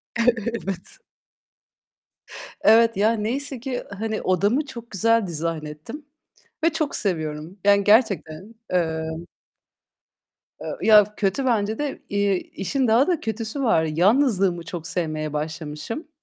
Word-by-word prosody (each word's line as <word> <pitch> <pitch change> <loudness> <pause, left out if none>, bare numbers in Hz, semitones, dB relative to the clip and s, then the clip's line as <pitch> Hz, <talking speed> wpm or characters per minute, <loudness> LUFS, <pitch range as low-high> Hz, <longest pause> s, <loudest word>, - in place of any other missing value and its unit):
Evet. 230 -5 -1 1.6
Evet. 230 0 +5
Ya, 215 +3 +4
neyse 245 +4 -3
ki, 250 0 -4 0.2
hani, 220 -1 -2
odamı 205 - +1
çok 235 -4 -10
güzel 230 +1 +2
dizayn 165 -1 -3
ettim 195 - -9 0.6
ve 330 - +5
çok 310 -3 -1
seviyorum. 160 -1 -3
Yani, 200 0 +5
gerçekten. 205 - +2
Emm... 160 -1 -2 1.3
Eee, - - -4
ya, 210 -1 +6
kötü 205 +7 0
bence 220 -3 +1
de. 290 -2 -3
İii, 200 -2 0
işin 255 +6 0
daha 235 +7 +4
da 350 -4 +1
kötüsü 225 +1 -4
var. 165 -10 +3
Yalnızlığımı 190 - +2
çok 165 0 -6
sevmeye 155 -4 -3
başlamışım. 155 - -5
205 Hz, 120 wpm, -23 LUFS, 165-230 Hz, 1.6 s, ya